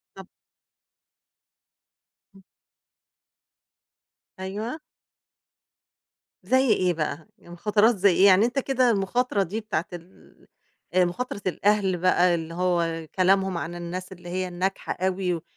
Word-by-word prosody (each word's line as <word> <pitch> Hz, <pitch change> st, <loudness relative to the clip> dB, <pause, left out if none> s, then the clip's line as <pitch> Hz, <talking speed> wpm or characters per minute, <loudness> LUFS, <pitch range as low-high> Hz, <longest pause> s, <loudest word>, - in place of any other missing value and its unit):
طَب -, -, -12 dB, 2.1 s
امم. 195 Hz, -, -18 dB, 2.0 s
أيوَه. 215 Hz, +10 st, -5 dB, 1.6 s
زي 260 Hz, 0 st, +2 dB
إيه 180 Hz, -1 st, +1 dB
بقى، 160 Hz, +2 st, -4 dB
يعني 175 Hz, -, -15 dB
مخاطرات 210 Hz, +5 st, +2 dB
زي 200 Hz, 0 st, +4 dB
إيه؟ 185 Hz, +3 st, +4 dB
يعني 195 Hz, +2 st, +6 dB
أنت 245 Hz, +3 st, -3 dB
كده 260 Hz, -2 st, +2 dB
المخاطرة 205 Hz, +1 st, 0 dB
دي 205 Hz, +5 st, -4 dB
بتاعة 175 Hz, -6 st, -2 dB
ال 175 Hz, +2 st, -14 dB, 0.5 s
آآ، 185 Hz, -1 st, +5 dB
مخاطرة 200 Hz, +4 st, -4 dB
الأهل 195 Hz, 0 st, +1 dB
بقى 180 Hz, 0 st, +3 dB
اللي 165 Hz, 0 st, -4 dB
هو 170 Hz, -2 st, -1 dB
كلامهم 190 Hz, -1 st, +2 dB
عن 165 Hz, +4 st, -5 dB
الناس 180 Hz, +2 st, -6 dB
اللي 175 Hz, -1 st, -11 dB
هي 185 Hz, +1 st, -2 dB
الناجحة 185 Hz, +2 st, -3 dB
أوي 185 Hz, -1 st, -1 dB
و 165 Hz, -, -6 dB
185 Hz, 120 wpm, -25 LUFS, 175-205 Hz, 2.1 s, يعني